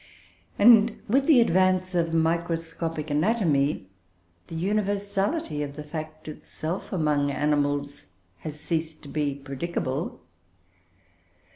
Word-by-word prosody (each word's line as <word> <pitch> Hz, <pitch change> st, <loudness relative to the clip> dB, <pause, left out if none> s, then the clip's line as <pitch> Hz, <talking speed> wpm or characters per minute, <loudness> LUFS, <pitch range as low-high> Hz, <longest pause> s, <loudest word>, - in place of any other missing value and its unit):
And, 225 Hz, 0 st, +6 dB
with 270 Hz, +6 st, +2 dB
the 300 Hz, -6 st, +7 dB
advance 185 Hz, -2 st, +2 dB
of 170 Hz, -2 st, +1 dB
microscopic 165 Hz, -1 st, -1 dB
anatomy, 150 Hz, -, +1 dB, 0.6 s
the 165 Hz, -, -8 dB
universality 200 Hz, -, -1 dB
of 145 Hz, -1 st, -4 dB
the 150 Hz, -, -6 dB
fact 155 Hz, +1 st, -7 dB
itself 155 Hz, +3 st, -6 dB
among 150 Hz, -5 st, +1 dB
animals 145 Hz, 0 st, -1 dB, 0.3 s
has 150 Hz, -1 st, -7 dB
ceased 160 Hz, 0 st, -3 dB
to 145 Hz, -, -10 dB
be 145 Hz, -2 st, -1 dB
predicable. 140 Hz, +1 st, -4 dB
160 Hz, 105 wpm, -26 LUFS, 150-185 Hz, 0.6 s, the